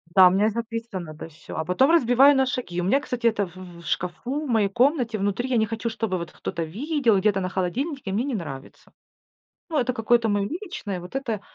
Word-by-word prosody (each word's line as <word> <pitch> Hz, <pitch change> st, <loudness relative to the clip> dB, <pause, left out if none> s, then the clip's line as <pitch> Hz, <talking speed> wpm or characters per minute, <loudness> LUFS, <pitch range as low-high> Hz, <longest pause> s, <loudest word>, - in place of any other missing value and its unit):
Да, 190 Hz, -1 st, +9 dB
у -, -, +1 dB
меня 195 Hz, +3 st, +3 dB
и -, -, +4 dB
записано, 225 Hz, -6 st, -5 dB
да, 160 Hz, -, -8 dB
всё, 160 Hz, -, -11 dB
а 160 Hz, -, -1 dB
потом 220 Hz, -, +3 dB
разбиваю 275 Hz, -2 st, +6 dB
на 265 Hz, 0 st, +3 dB
шаги. 235 Hz, -9 st, -3 dB
У 175 Hz, -, -2 dB
меня, 265 Hz, +9 st, +3 dB
кстати, 250 Hz, -4 st, -3 dB
это 210 Hz, -4 st, +2 dB
в 175 Hz, +1 st, -16 dB, 0.2 s
в 170 Hz, -, -15 dB
шкафу 240 Hz, -, -2 dB
в -, -, -6 dB
моей 220 Hz, -4 st, +2 dB
комнате 245 Hz, +1 st, +1 dB
внутри. 205 Hz, +5 st, -1 dB
Я 245 Hz, -, +2 dB
не 220 Hz, -1 st, +3 dB
хочу, 225 Hz, +2 st, -3 dB
чтобы 220 Hz, -4 st, -2 dB
вот 170 Hz, 0 st, -7 dB
кто-то 170 Hz, -, -4 dB
видел 235 Hz, -, +1 dB
где-то 195 Hz, 0 st, +2 dB
на 185 Hz, -, -2 dB
холодильнике. 205 Hz, -, -2 dB
Мне 225 Hz, +6 st, 0 dB
не 275 Hz, -4 st, -2 dB
нравится. 140 Hz, -8 st, -8 dB, 0.8 s
Ну, 310 Hz, -, 0 dB
это 255 Hz, 0 st, +1 dB
какое-то 230 Hz, -1 st, +2 dB
моё 205 Hz, -1 st, +1 dB
личное, 305 Hz, -, -5 dB
вот 180 Hz, +9 st, -7 dB
это 230 Hz, -7 st, -2 dB
225 Hz, 225 wpm, -24 LUFS, 190-255 Hz, 0.8 s, Да